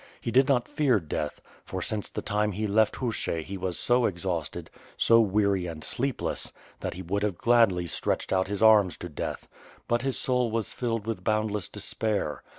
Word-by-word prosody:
He 115 - -3
did 130 +2 +5
not 125 -3 +2
fear 145 -6 +2
death, 75 -2 -4 0.2
for - - -5
since 105 -2 -3
the - - -5
time 105 0 0
he 105 +3 -2
left 105 +1 +3
Hushch 110 -9 -2
he 100 - -6
was 95 -2 -3
so 120 -1 +3
exhausted, 85 -4 -4 0.3
so 115 0 +5
weary 100 -3 +1
and 80 -2 -7
sleepless, 135 +1 -2 0.3
that - - -4
he 95 - -6
would 100 +4 -1
have 100 -4 -1
gladly 115 -7 +4
stretched 85 - -1
out 95 0 +2
his 100 +2 -2
arms 105 -5 +6
to 90 - -7
death 75 - -5 0.2
— - - -25
^but 120 0 +1
his 135 0 -1
soul 125 -2 +1
was 110 -1 -2
filled 115 -4 -2
with 115 -1 -4
boundless 110 -3 0
despair. 105 -9 -2
105 Hz, 190 wpm, -27 LUFS, 95-115 Hz, 0.3 s, arms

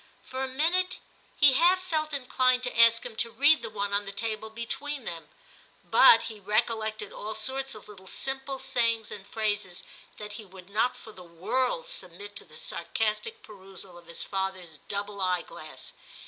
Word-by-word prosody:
For 260 +1 -4
a - - -1
minute 335 +8 +2 0.4
he 290 -3 +8
half 350 +7 +5
felt 315 -4 -1
inclined 255 -2 +2
to 250 - -2
ask 230 0 +6
him 240 -2 -7
to 235 - +2
read 285 +7 +6
the - - -4
one 200 -1 -2
on 205 0 +2
the 195 - -5
table 220 +1 -3
between 270 +4 -4
them, 165 -3 -6 0.5
but 230 - +7
he 215 -2 -6
recollected 215 0 0
all 215 +1 -5
sorts 265 +4 -1
of 215 - -12
little 190 -3 -13
simple 270 +3 -3
sayings 230 -4 0
and 200 -1 -8
phrases 210 -5 -2 0.3
that 210 0 -7
he 215 +1 -7
would 190 -1 -14
not 225 +4 +1
for 220 - -12
the 185 -3 -12
world 250 - -1
submit 425 -4 -6
to - - -3
the - - -10
sarcastic 450 - -1
perusal 195 -3 -7
of 175 -1 -14
his 170 - -4
father's 190 -5 -4
double 200 0 -3
eyeglass. 180 -4 -3
220 Hz, 175 wpm, -28 LUFS, 200-265 Hz, 0.5 s, he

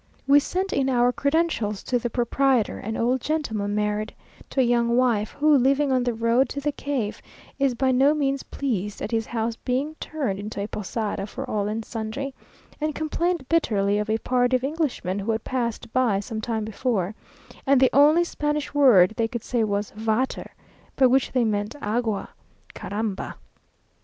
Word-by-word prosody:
We 280 +1 +6
sent 375 +6 -2
in 270 -1 +1
our 245 -1 +3
credentials 280 -8 0
to 245 - 0
the 240 - -2
proprietor, 245 0 +1
an 220 +2 -4
old 250 +2 +1
gentleman 220 -10 -2
married 210 0 -1 0.3
to - - -2
a - - +6
young 235 0 +2
wife, 230 -5 +2
who, 300 +1 +4
living 275 +2 +3
on 255 -1 +3
the 245 -1 0
road 230 +3 +2
to 280 - -4
the 295 +1 -1
cave, 270 -7 -3 0.4
is 275 -3 +2
by 260 +2 +2
no 270 +4 +4
means 275 -2 0
pleased 210 -7 -3
at - - -4
his 225 -1 0
house 230 0 -2
being 270 +5 -2
turned 265 -12 -3
into 205 0 -6
a 200 - -1
posada 210 -1 -3
for 265 +5 -6
all 205 -3 -1
and 220 +1 -3
sundry, 240 +5 -4 0.5
and 305 -1 -1
complained 325 -1 -1
bitterly 205 -11 +2
of 210 +1 -3
a 220 - +2
party 245 +2 +1
of 255 - 0
Englishmen 275 - -2
who 205 +3 -1
had 220 - -2
passed 235 -3 -3
by 245 -6 +2
some 220 +2 -5
time 220 -1 -2
before, 215 -3 -1 0.5
"and 275 -1 +5
the 260 -1 +4
only 300 +5 +6
Spanish 295 -3 -2
word 230 -10 +6
they 230 -1 +1
could 235 -1 -5
say, 240 -3 0
was 205 -1 -1
Vater, 220 +4 -1 0.5
by 265 - +4
which 255 +1 +3
they 250 -2 +2
meant 210 -1 -1
Agua, 220 -2 -1 0.4
Caramba!" 205 -1 -4
240 Hz, 180 wpm, -24 LUFS, 215-275 Hz, 0.5 s, We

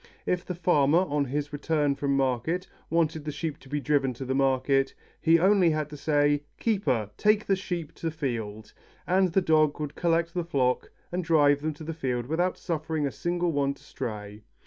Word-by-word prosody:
If 180 -1 0
the 180 - -5
farmer, 160 -3 +3
on 150 -5 +1
his 145 +2 -3
return 145 -1 +1
from 140 0 0
market, 135 +8 0 0.2
wanted 160 -2 +1
the 150 - -3
sheep 150 0 -4
to 135 - -16
be 145 +1 -1
driven 140 -3 +1
to 130 - -6
the 130 - -1
field, 135 0 +2 0.3
he 165 - +5
had 170 +2 +4
only 195 -4 +5
to 155 -1 -2
say, 145 0 +2 0.2
"Keeper, 130 - 0
take 210 0 +3
the 195 - +2
sheep 175 -5 -5
to 165 - -2
field," 115 -9 -4 0.3
and 185 0 +2
the 190 - +4
dog 155 -3 +3
would 150 -2 -4
collect 170 -1 +1
the 175 -2 -1
flock 130 -7 0 0.2
and 180 +1 -2
drive 145 -3 +4
them 155 0 -2
to 155 - -10
the 165 +1 -4
field 125 -6 -2
without 175 +6 0
suffering 160 -2 -2
a 140 - -1
single 175 +2 -1
one 140 -2 0
to 140 - -21
stray. 105 -6 -6
150 Hz, 195 wpm, -27 LUFS, 140-170 Hz, 0.3 s, he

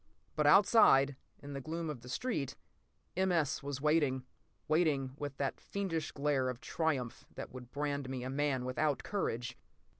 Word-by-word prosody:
p> - - -39 0.3
But 150 -1 +3
outside, 145 - +6 0.3
in 145 0 -7
the 140 - -4
gloom 165 +3 -3
of 150 -6 -5
the 125 - -11
street, 150 - -2 0.6
M. 190 +1 +2
S. 160 -5 +1
was 140 -1 -4
waiting, 145 -4 +2 0.4
waiting 150 -5 +2
with 145 -1 -5
that 140 -1 -1
fiendish 180 -6 -3
glare 140 -3 +1
of 125 -1 -4
triumph 140 -9 -1
that - - -6
would 125 -2 -9
brand 145 -2 -2
me 130 -2 -3
a 130 - -3
man 135 -2 0
without 140 +3 0
courage. 120 - -2
145 Hz, 170 wpm, -34 LUFS, 130-155 Hz, 0.6 s, outside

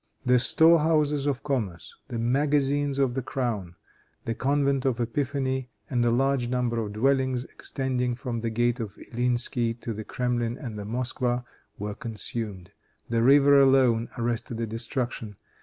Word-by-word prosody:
The 125 0 +5
store 165 +6 +6
houses 150 -2 +1
of 140 -2 -1
commerce, 110 - -3
the 120 - -5
magazines 140 +3 +1
of 135 -3 +2
the 135 - -2
crown, 110 -9 -3 0.5
the 115 - -1
convent 140 +1 +1
of 130 -3 0
Epiphany 130 +1 -1 0.2
and 120 -2 +2
a 120 - +3
large 130 +1 +1
number 120 -1 0
of 105 -2 -4
dwellings, 130 +2 +1
extending 125 -2 -2
from 125 -2 -4
the 115 0 -2
gate 120 +2 0
of 105 -3 -6
Illinsky, 120 -1 0
to 115 - -4
the 110 +1 -6
Kremlin 120 0 -2
and 115 -8 -6
the 100 - -6
Moskwa, 125 +1 -1 0.3
were 105 +1 -4
consumed. 105 -4 -4 0.4
The 115 -1 +1
river 140 +2 +6
alone 130 -4 +4
arrested 120 0 -2
the 115 - -1
destruction. 115 -1 -3
125 Hz, 155 wpm, -26 LUFS, 115-135 Hz, 0.5 s, store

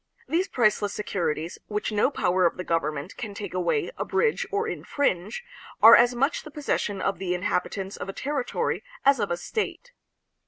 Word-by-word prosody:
These 355 +4 +1
priceless 215 - +1
securities, 170 -5 -2
which 210 +1 -2
no 210 +4 +3
power 185 -8 +1
of - - -4
the 180 - -4
government 155 0 -2
can 210 -4 -6
take 200 -3 -6
away, 185 - 0
abridge, 455 -2 +1
or 420 +3 -1
in - - -4
fringe, 215 - -1 0.4
are 225 - +10
as 240 +1 +5
much 275 +5 +1
the - - -10
possession 245 -9 -2
of 195 - -1
the 180 -2 -1
inhabitants 190 +1 -2
of 195 - -6
a - - -4
territory 275 +1 -2 0.2
as 275 -2 +5
of 205 - 0
a 175 - -1
state. 440 - -4
205 Hz, 180 wpm, -26 LUFS, 180-275 Hz, 0.4 s, are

